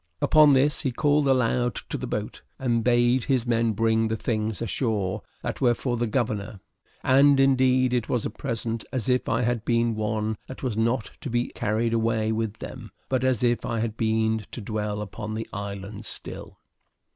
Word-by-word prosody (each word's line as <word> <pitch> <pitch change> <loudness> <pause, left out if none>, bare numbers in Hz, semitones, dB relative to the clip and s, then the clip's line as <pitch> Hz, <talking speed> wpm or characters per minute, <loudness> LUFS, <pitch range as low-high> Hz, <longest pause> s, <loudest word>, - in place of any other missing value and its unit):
Upon 150 -2 +6
this, 140 +3 +3
he 135 - -1
called 145 +3 +2
aloud 125 -2 +2
to - - -3
the - - -4
boat, - - -4 0.2
and 120 -3 0
bade 120 +1 +3
his 130 -4 +1
men 115 -2 +1
bring 110 +1 +2
the 110 0 -2
things 110 -2 -2
ashore 110 -4 -1 0.2
that - - -4
were 120 -2 +4
for 125 0 -2
the 120 0 -1
governor; 105 -4 -2 0.4
and, 140 +1 +5
indeed, 130 -1 +4
it 120 -3 0
was 120 - 0
a - - -2
present 115 -2 -3
as 125 -5 -2
if 125 0 +1
I - - +1
had 120 -2 0
been 115 -1 +1
one 110 0 -1
that 130 - -9
was 125 -5 -1
not 115 +1 0
to 145 - -4
be 120 +1 0
carried 115 +1 -1
away 110 -1 +1
with 110 -1 -1
them, 115 -3 -9 0.2
but 130 -1 +1
as 130 -3 +1
if 120 -1 +2
I 115 - -2
had 110 -1 -2
been 110 0 +1
to - - -7
dwell 105 -1 -3
upon 105 +2 -6
the 110 - -4
island 100 0 -6
still. - - -8
115 Hz, 190 wpm, -25 LUFS, 110-125 Hz, 0.4 s, Upon